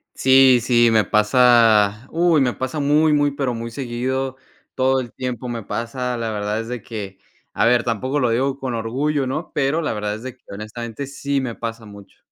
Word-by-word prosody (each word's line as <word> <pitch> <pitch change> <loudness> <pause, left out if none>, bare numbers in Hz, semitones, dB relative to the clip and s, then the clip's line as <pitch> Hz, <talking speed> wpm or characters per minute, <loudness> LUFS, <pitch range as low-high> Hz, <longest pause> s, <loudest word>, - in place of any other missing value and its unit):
Sí, 130 -1 +6
sí, 120 0 +4
me 110 -1 +4
pasa. 110 0 +4
Uy, 170 -2 +2
me 125 -2 +1
pasa 130 +4 -4
muy, 150 +2 +3
muy, 145 -1 +2
pero 135 -3 -2
muy 115 0 -5
seguido. 130 +1 -3 0.4
Todo 130 0 +2
el 120 -3 -7
tiempo. 125 -1 -5
Me 115 -2 -4
pasa, 125 +3 -3
la 115 -1 -3
verdad 105 0 -2
es 115 - -5
de 125 -1 -5
que, 100 -4 -7 0.3
a - - +1
ver, 120 0 +3
tampoco 130 +5 -1
lo 125 -3 +1
digo 135 +4 0
con 130 -2 -3
orgullo, 130 +5 -1
¿no? 155 +6 -4
Pero 145 +3 0
la 155 - -2
verdad 105 0 -3
es 110 - -10
de 130 -1 -7
que, - - -45
honestamente, 115 +5 -6
sí 140 0 -2
me 125 -4 -4
pasa 115 -1 -6
mucho. 100 -1 -14
125 Hz, 200 wpm, -21 LUFS, 115-135 Hz, 0.4 s, Sí